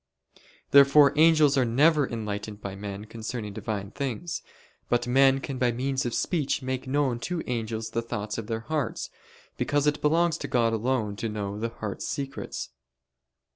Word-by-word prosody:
Therefore 140 +1 +7
angels 155 -3 +5
are - - +4
never 145 +5 +3
enlightened 105 -2 -4
by 100 -2 -6
men 100 +1 -6
concerning 110 -1 -6
Divine 100 -1 -4
things. 140 +6 -4 0.5
But 120 0 +2
men 135 +2 +4
can 135 -1 -5
by 125 -1 +3
means 130 +2 -1
of 120 - -3
speech 150 -6 0
make 130 0 -3
known 135 -3 +1
to 175 +6 -3
angels 115 -2 -3
the 115 - -1
thoughts 105 -1 -4
of 110 - -6
their 110 0 -2
hearts: 135 0 -3 0.5
because 145 0 +1
it 150 0 +1
belongs 165 +2 +2
to - - -4
God 115 -2 +2
alone 110 -3 -1
to 115 - -2
know 105 -1 -4
the 115 +1 -1
heart's 110 -3 -5
secrets. 135 -1 -4
120 Hz, 165 wpm, -27 LUFS, 110-140 Hz, 0.5 s, Therefore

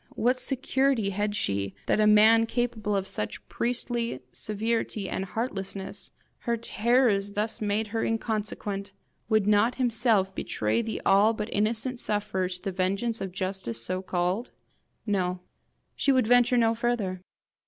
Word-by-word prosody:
what 250 +3 +2
security 265 -5 +1
had 205 +1 -1
she 100 - -1
that - - +2
a 210 - +5
man 220 +2 +6
capable 225 -4 -1
of 195 -1 -1
such 105 - -4
priestly 235 - -2
seveirity 215 -1 -2
and 190 - -3
heartlessness 195 -2 -4 0.3
her 235 -1 -1
terrors 225 -2 +2 0.3
made 210 +1 0
her 225 +1 -1
thus - - 0
inconsequent 210 -3 -3 0.4
would 215 -3 +3
not 210 +3 +3
himself 225 -6 +2
betray 110 - -1
the 225 -1 -4
all 200 +3 +5
but 215 0 -4
innocent 225 +4 0
sufferer 205 -4 -1
to 180 -1 -6
the 195 - -2
vengeance 195 +5 -1
of 190 -1 -3
justice 185 - -3
so 185 0 -2
called? 185 +5 -1 0.6
No; 185 -4 -1 0.5
she 280 - +2
would 260 -3 +3
venture 245 +1 +4
no 225 -1 +4
farther. 225 -6 -1
215 Hz, 145 wpm, -27 LUFS, 195-235 Hz, 0.6 s, man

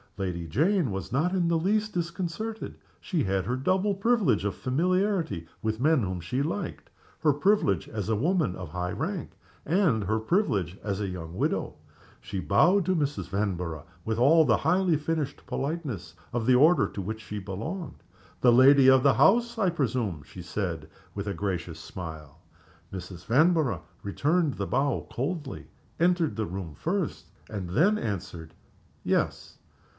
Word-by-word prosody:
Lady 90 -4 -3
Jane 155 - +2
was 95 0 -5
not 155 +8 +1
in 180 -3 +1
the 170 0 +2
least 210 +5 0
disconcerted. 180 +5 -4 0.2
She 170 -7 -1
had 95 -2 0
her 120 +5 -1
double 185 +9 +1
privilege 195 - +2
of 100 - -1
familiarity 170 - 0 0.2
with 110 0 0
the 125 - -4
men 155 -2 +4
whom 95 -2 -3
she 105 +11 -2
liked 170 +7 -4 0.3
her 150 -2 +3
privilege 145 - +2
as 105 -1 -4
a 110 - +2
woman 155 - +1
of 90 -4 -7
high 90 +2 -3
rank, - - -3 0.3
and 160 - +2
her 110 +3 0
privilege 105 - 0
as 100 -1 -2
a 100 - -1
young 85 -2 -6
widow. - - -1 0.4
She 95 - -5
bowed 175 - +3
to 185 - +1
Mrs. 140 - -2
Vanborough, 90 -6 -2 0.2
with 110 0 -2
all 160 +6 +6
the - - +4
highly 180 -2 +2
finished 150 -2 -3
politeness 140 - -4 0.2
of 120 -2 -1
the 130 - +6
order 155 +7 +5
to 100 - -6
which 110 +4 -5
she 105 -1 -6
belonged. 110 - -6 0.4
"The 125 - +6
lady 130 +2 +7
of 130 -1 +6
the 140 -2 +4
house, 235 - +4
I 195 -4 +2
presume?" 120 - -1
she 90 +6 -11
said, 85 -4 -4 0.3
with 100 0 -4
a 100 - -1
gracious 85 -3 -3
smile. 80 -4 -8 0.5
Mrs. 90 -2 -8
Vanborough 155 +2 +3 0.2
returned 150 - +1
the 100 - -3
bow 135 0 0
coldly 145 +1 -4 0.3
entered 170 - +2
the 110 0 -1
room 90 -4 -6
first 180 -1 -2 0.2
and 100 -5 -5
then 190 - +3
answered, 90 - -5 0.5
"Yes." - - -1
125 Hz, 160 wpm, -27 LUFS, -, 0.5 s, lady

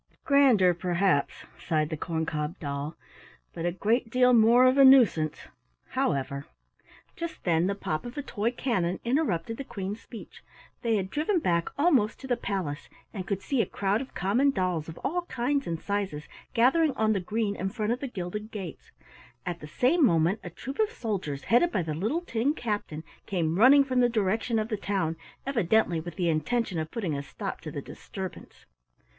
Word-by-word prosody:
"Grander, 260 - +5
perhaps," 175 -3 0
sighed 155 -2 0
the - - -1
corn 160 +1 -2
cob 150 +2 -3
doll, 140 +1 -4 0.6
"but 165 - -3
a - - +1
great 225 +6 0
deal 250 +1 +4
more 235 +2 +6
of 255 +2 +4
a - - +9
nuisance. 235 - +5 0.5
However 140 0 -1 0.3
" - - -27
Just 335 -1 -6
then 170 0 +2
the 200 - -1
pop 155 -6 -3
of 240 +3 -8
a 290 - -2
toy 220 -4 -1
cannon 210 -8 -1
interrupted 230 - 0
the 275 - -4
Queen's 205 -3 -5
speech. 230 - -11 0.4
They 230 -2 +1
had 190 -2 -2
driven 320 +6 +1
back 170 - +1
almost 275 -9 +3
to - - -8
the 245 - +2
palace, 190 -11 -4 0.2
and 190 -4 -5
could 195 -1 -2
see 270 -4 +1
a - - -1
crowd 200 +3 0
of 265 - -9
common 220 +10 +2
dolls 180 - -1
of 165 - -9
all 350 +3 -1
kinds 275 +3 -1
and 165 -1 -2
sizes 195 -7 -3 0.3
gathering 275 +6 +4
on 220 -1 +2
the 200 - 0
green 210 +2 -1
in 190 0 -2
front 215 +1 -2
of 245 - -1
the 275 - -4
gilded 210 -1 -5
gates. 195 -7 -8 0.6
At 175 -1 -3
the 150 - -9
same 275 - +2
moment 175 - +3
a 180 - -6
troop 265 - -8
of 435 -1 +3
soldiers, 190 - -4
headed 290 +10 +3
by 185 - 0
the 160 -1 -3
little 215 - -1
tin 275 -2 0
captain, 205 - -3 0.2
came 170 -2 0
running 275 +5 +8
from 260 -2 0
the 245 -1 +4
direction 225 +1 0
of 215 0 -1
the 215 - -1
town 190 -5 -1 0.3
evidently 220 -8 +2
with 165 0 -7
the 175 - 0
intention 190 +3 0
of 155 0 -3
putting 185 -9 -3
a 140 - -2
stop 140 - -6
to - - -6
the - - -6
disturbance. - - -9
205 Hz, 190 wpm, -28 LUFS, 170-245 Hz, 0.6 s, a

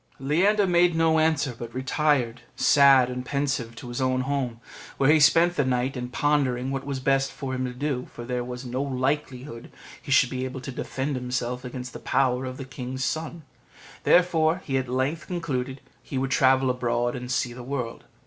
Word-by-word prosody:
Leander 190 +10 +2
made 175 -1 +3
no 160 -1 +3
answer, 155 -4 +1
but 120 0 -8
retired 130 -3 0
sad 140 -3 +6
and 125 0 -4
pensive 135 -4 -2
to 120 - -9
his 120 +2 -4
own 130 0 +1
home, 130 -3 -2 0.4
where 140 +2 +4
he 155 - +5
spent 165 +4 +5
the 145 - +2
night 130 +1 0
in 125 -1 -4
pondering 135 -2 0
what 135 0 -4
was 140 -2 -2
best 135 +1 +1
for 135 -2 -5
him 130 0 -1
to 125 - -3
do, 130 0 -3
for 120 - -8
there 125 0 -2
was 125 +1 -7
no 125 +2 -2
likelihood 130 -2 -3 0.3
he - - -8
should 130 -2 +5
be 130 0 -3
able 130 0 -5
to 135 +1 -7
defend 135 +2 -3
himself 125 0 -3
against 125 0 -7
the - - -7
power 130 -1 +1
of 130 0 -6
the 135 - -6
king's 130 0 -5
son; 160 +1 -3 0.6
therefore 175 0 +3
he 135 - -2
at 130 -2 -1
length 130 +6 -1
concluded 140 -7 -3 0.2
he 130 - -6
would 135 +1 -1
travel 130 -1 +4
abroad 120 -1 -1
and 125 0 -6
see 125 -1 0
the 125 - -9
world. 125 -2 -5
130 Hz, 195 wpm, -25 LUFS, 125-145 Hz, 0.6 s, sad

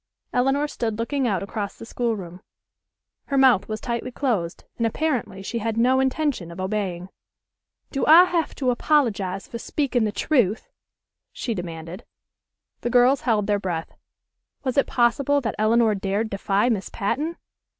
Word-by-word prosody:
Elinor 270 +4 +2
stood 225 -6 -3
looking 260 +3 -1
out 195 -5 0
across 200 0 -5
the - - -9
schoolroom. 200 -8 -3 0.8
Her 280 - -1
mouth 260 -7 +5
was 215 0 -4
tightly 235 +2 -3
closed, 225 -11 -2 0.2
and 230 - +2
apparently 230 -8 -2
she 235 +4 -3
had 225 0 -2
no 255 +3 +4
intention 265 - 0
of 170 - -10
obeying. 185 -2 -3 0.8
"Do 275 - -1
I 325 +4 +10
have 345 -3 -1
to 255 -3 +1
apologize 220 -9 +1
for 235 - -7
speaking 260 -3 0
the 210 - 0
truth?" 225 -5 0 0.6
she 235 - -3
demanded. 170 +1 -7 0.8
The 240 - -2
girls 250 +3 +4
held 215 -4 +1
their 205 0 +1
breath. 175 -4 -4 0.7
Was 260 -2 -1
it 280 - +3
possible 265 +4 +2
that 225 -4 -2
Elinor 220 0 +4
dared 200 +2 -2
defy 200 +2 +1
Miss 215 -6 -1
Patten? 295 +11 -2
230 Hz, 150 wpm, -24 LUFS, 200-265 Hz, 0.8 s, I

